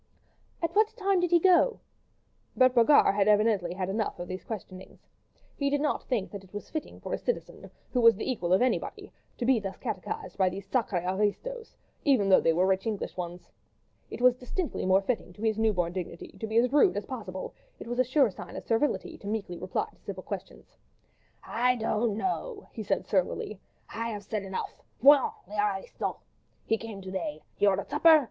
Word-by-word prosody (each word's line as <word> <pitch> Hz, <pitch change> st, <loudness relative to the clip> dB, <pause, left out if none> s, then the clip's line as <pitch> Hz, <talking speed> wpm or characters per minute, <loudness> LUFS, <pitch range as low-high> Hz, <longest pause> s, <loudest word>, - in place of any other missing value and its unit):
"At 335 Hz, -, -1 dB
what 435 Hz, +1 st, +3 dB
time 395 Hz, -3 st, +2 dB
did 355 Hz, 0 st, +1 dB
he 345 Hz, -, +6 dB
go?" 375 Hz, +7 st, +4 dB, 0.8 s
But 255 Hz, 0 st, +5 dB
Brogard 240 Hz, -1 st, +6 dB
had 200 Hz, 0 st, +2 dB
evidently 210 Hz, -4 st, +3 dB
had 185 Hz, -1 st, -2 dB
enough 210 Hz, +3 st, -2 dB
of 175 Hz, -, -6 dB
these 185 Hz, +1 st, -6 dB
questionings. 190 Hz, -4 st, -9 dB, 0.5 s
He 280 Hz, -1 st, 0 dB
did 290 Hz, 0 st, +1 dB
not 295 Hz, +1 st, 0 dB
think 230 Hz, -7 st, -1 dB
that 200 Hz, -2 st, -7 dB
it 190 Hz, -, -19 dB
was 205 Hz, -, -7 dB
fitting 310 Hz, -2 st, -5 dB
for -, -, -5 dB
a -, -, -1 dB
citizen—who 275 Hz, -, -4 dB
was 230 Hz, -1 st, +7 dB
the 210 Hz, -, -5 dB
equal 200 Hz, -9 st, -1 dB
of 190 Hz, +6 st, +5 dB
anybody—to 250 Hz, -1 st, -3 dB
be 255 Hz, -2 st, +4 dB
thus 195 Hz, -2 st, -6 dB
catechised 435 Hz, -, -5 dB
by 190 Hz, -1 st, +4 dB
these 195 Hz, +1 st, -8 dB
sacrrés 195 Hz, -6 st, 0 dB
aristos, 210 Hz, -, -2 dB, 0.3 s
even 255 Hz, -9 st, +3 dB
though 190 Hz, -, +7 dB
they 165 Hz, -, +3 dB
were 175 Hz, +3 st, +2 dB
rich 190 Hz, +3 st, +1 dB
English 215 Hz, -3 st, -3 dB
ones. 175 Hz, 0 st, -6 dB, 0.6 s
It -, -, -7 dB
was 250 Hz, 0 st, +7 dB
distinctly 255 Hz, -, -3 dB
more 190 Hz, +1 st, +4 dB
fitting 220 Hz, -5 st, -2 dB
to 205 Hz, -, -10 dB
his 220 Hz, -1 st, +1 dB
new 220 Hz, 0 st, +4 dB
born 175 Hz, -3 st, -1 dB
dignity 175 Hz, -2 st, -6 dB
to 220 Hz, -, -3 dB
be 220 Hz, +1 st, 0 dB
as 250 Hz, +3 st, +3 dB
rude 290 Hz, -8 st, +5 dB
as 205 Hz, -, -3 dB
possible; 205 Hz, -8 st, -6 dB, 0.2 s
it -, -, -9 dB
was 240 Hz, +2 st, -4 dB
a -, -, +6 dB
sure 255 Hz, -2 st, +3 dB
sign -, -, -10 dB
of -, -, -7 dB
servility 235 Hz, +6 st, 0 dB
to 200 Hz, -, -9 dB
meekly 205 Hz, -5 st, -3 dB
reply 185 Hz, 0 st, -1 dB
to -, -, -27 dB
civil 190 Hz, -2 st, -7 dB
questions. 195 Hz, -1 st, -8 dB, 0.7 s
"I 250 Hz, +2 st, +1 dB
don't 220 Hz, -2 st, 0 dB
know," 405 Hz, -, -3 dB
he 225 Hz, -, -5 dB
said 210 Hz, -, -1 dB
surlily. 190 Hz, +1 st, -1 dB, 0.3 s
"I 230 Hz, +1 st, -4 dB
have 210 Hz, -2 st, -5 dB
said 215 Hz, +1 st, -3 dB
enough, 190 Hz, -1 st, -5 dB, 0.2 s
voyons, 280 Hz, +1 st, +6 dB
les 210 Hz, +2 st, -5 dB
aristos!... 200 Hz, -2 st, -1 dB, 0.5 s
He 225 Hz, -, +1 dB
came 215 Hz, -4 st, -8 dB
to 185 Hz, -, -7 dB
day. 295 Hz, +11 st, -4 dB
He 205 Hz, -, +3 dB
ordered 195 Hz, 0 st, +1 dB
supper. 315 Hz, +2 st, +7 dB
220 Hz, 200 wpm, -28 LUFS, 190-255 Hz, 0.8 s, was